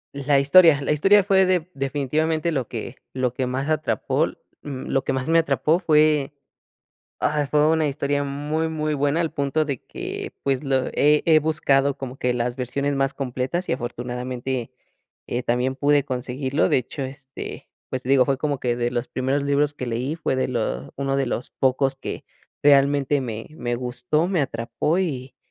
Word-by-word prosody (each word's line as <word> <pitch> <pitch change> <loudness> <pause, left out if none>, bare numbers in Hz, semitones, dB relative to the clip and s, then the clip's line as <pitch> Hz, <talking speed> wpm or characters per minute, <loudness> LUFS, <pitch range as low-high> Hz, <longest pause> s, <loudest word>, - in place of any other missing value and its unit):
La 140 0 +2
historia, 150 +1 +6
la 140 - -1
historia 195 +7 +5
fue 190 -1 +4
de 180 -3 +1
definitivamente 150 +4 -1
lo 135 -7 -1
que 120 +2 -6 0.2
lo 130 -2 -1
que 130 0 -2
más 130 +3 -2
atrapol 155 -9 0 0.2
mm, 135 -3 -6
lo 135 - 0
que - - -1
más 130 -1 -2
me 165 +1 +5
atrapó 165 +1 +2
fue, 150 -4 +3 0.8
ah, 150 -1 +1
fue 150 0 +4
una 160 -2 +2
historia 145 0 -1
muy 150 +3 -2
muy 155 -1 -1
buena 145 +3 +1
al 165 -2 -1
punto 140 +2 0
de 140 -4 -4
que, - - -6
pues, 135 0 0
lo 135 -2 +1
he 150 +1 +4
he 160 -2 +6
buscado, 140 -3 +1
como 130 -2 -6
que 125 0 0
las 120 0 -1
versiones 140 +3 -2
más 135 0 0
completas 135 +6 -3
y - - +1
afortunadamente, 125 0 -4 0.6
eh, 120 +1 -2
también 125 +2 0
pude 145 +1 +2
conseguirlo. 130 +2 -1
De - - +4
hecho, 130 +3 -5
este, 135 0 -8 0.2
pues, 130 0 -4
digo, 130 0 +4
fue 135 -1 +1
como 145 -2 -1
que 120 -1 0
de 120 0 0
los 120 0 -3
primeros 135 +2 -1
libros 145 +1 +1
que 125 -4 -5
leí, 125 +6 -2
fue 150 -5 -1
de - - +1
lo 110 - -3
uno 135 0 -1
de 135 - +1
los 125 0 -3
pocos 135 +1 +1
que - - -6 0.4
realmente 140 0 +4
me 115 -3 -5
me 120 -5 -2
gustó, 125 +6 -1
me 185 -2 0
atrapó 135 +7 -1
y, 135 -8 -3
140 Hz, 180 wpm, -23 LUFS, 130-150 Hz, 0.8 s, historia